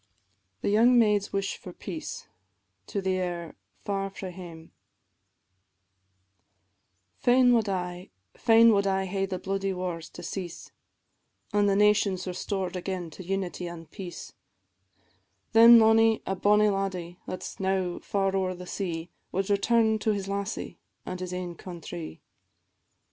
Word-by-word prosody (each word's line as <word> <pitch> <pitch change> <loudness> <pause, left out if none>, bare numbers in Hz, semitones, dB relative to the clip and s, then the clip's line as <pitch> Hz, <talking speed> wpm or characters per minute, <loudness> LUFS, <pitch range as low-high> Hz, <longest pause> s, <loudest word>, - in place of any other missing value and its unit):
THE - - +1
YOUNG 235 +4 +5
MAID'S 210 -3 +3
WISH 195 0 -2
FOR 180 - -10
PEACE. 315 - -7 0.7
AIR 185 -4 -2 0.3
"Far 195 -1 -1
frae 190 -1 -7
Hame," 170 -3 -11 2.5
&c. - - -31
Fain 245 0 +6
wad 225 -3 +2
I, 180 -1 -4 0.3
fain 230 -1 +6
wad 200 -1 +2
I 190 0 +1
hae 195 +1 -1
the 185 -1 -3
bloody 195 +1 -2
wars 180 -3 -4
to - - -11
cease, 180 -4 -6 0.8
An' 205 0 +3
the 200 - +3
nations 205 -2 +3
restored 185 0 -3
again 180 -2 -4
to 185 - -10
unity 185 -1 -3
an' 170 -1 -8
peace; 175 +2 -9 1.2
Then 230 +1 +9
mony 225 0 +5
a 195 - -1
bonnie 210 +2 +4
laddie, 185 -3 -3
that 185 0 -5
's - - -7
now 190 -2 0
far 195 -1 -1
owre 185 -1 0
the 180 0 -9
sea, 175 -3 -4 0.2
Wad 195 +2 -1
return 220 +2 +3
to 215 0 +1
his 195 -1 -4
lassie, 200 +1 -4 0.3
an' 185 - -5
his 185 -1 -5
ain 180 -1 -4
countrie. 170 - -8
195 Hz, 140 wpm, -27 LUFS, 180-205 Hz, 2.5 s, Then